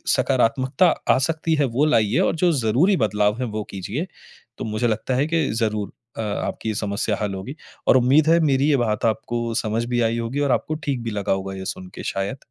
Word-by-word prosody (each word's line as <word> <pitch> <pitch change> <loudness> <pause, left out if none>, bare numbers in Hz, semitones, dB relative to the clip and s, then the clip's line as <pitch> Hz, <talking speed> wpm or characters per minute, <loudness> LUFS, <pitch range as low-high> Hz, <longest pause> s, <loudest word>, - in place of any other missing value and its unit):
सकारात्मकता 130 +6 +2 0.2
आ - - +4
सकती 160 0 0
है 145 -2 +2
वो 145 - +4
लाइए 115 -7 +2
और - - +2
जो 175 - +5
ज़रूरी 150 - +3
बदलाव 105 -2 +1
है - - 0
वो 105 - -2
कीजिए। 110 - -4 0.5
तो - - -4
मुझे 110 +2 -1
लगता 115 +4 -1
है 140 +4 +1
कि 165 -3 +1
ज़रूर 110 -3 -1 0.3
अ, - - -2
आपकी 110 +1 -3
ये 110 - -2
समस्या 105 +1 -1
हल 105 -2 -1
होगी 110 +9 -7 0.3
और - - +7
उम्मीद 135 +5 +4
है 165 +1 +5
मेरी 140 -2 +2
ये 145 - +4
बात 110 -4 0
आपको 115 +1 -1
समझ 110 +2 -1
भी 120 - +2
आई 115 0 +1
होगी 115 +4 -3
और 140 -2 +1
आपको 155 - 0
ठीक 135 -4 -1
भी 115 - -3
लगा 100 -1 -2
होगा 95 0 -4
ये 95 0 -7
सुन 95 -1 -6
के - - -7
शायद। 100 +8 -2
115 Hz, 220 wpm, -22 LUFS, 105-140 Hz, 0.5 s, और